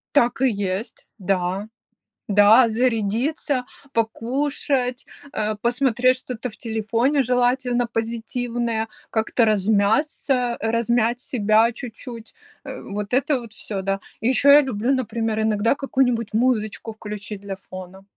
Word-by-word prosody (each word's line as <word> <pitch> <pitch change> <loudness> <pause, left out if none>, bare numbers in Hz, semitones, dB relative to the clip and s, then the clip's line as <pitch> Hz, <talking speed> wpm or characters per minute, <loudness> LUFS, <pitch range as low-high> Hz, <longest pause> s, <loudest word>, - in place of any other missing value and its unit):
Так 245 -2 +3
и 265 - +5
есть, 200 0 -4
да. 190 +1 -1 0.6
Да, 210 +4 +6
зарядиться, 245 +4 0 0.3
покушать, 250 +3 -1 0.3
а, 215 0 -1
посмотреть 250 +2 +2
что-то 250 -1 -5
в 215 - -13
телефоне, 230 +5 0
желательно 245 -1 +1
позитивное, 230 0 -2 0.2
как-то 225 +1 +2
размяться, 220 +5 +1
размять 235 +1 +1
себя 220 -1 +3
чуть-чуть, 235 -1 -9 0.3
э, - - -7
вот 205 +2 -5
это 280 +1 +2
вот 230 -2 -11
всё, 200 -3 -5
да. 195 +1 -1 0.2
И 225 - 0
еще 265 +2 +4
я 290 +1 +9
люблю, 245 -2 -1
например, 225 -3 -1
иногда 220 +1 +2
какую-нибудь 250 -5 0
музычку 225 -2 0
включить 210 -1 -7
для 200 -1 -5
фона, 185 0 -11
230 Hz, 120 wpm, -22 LUFS, 215-250 Hz, 0.6 s, я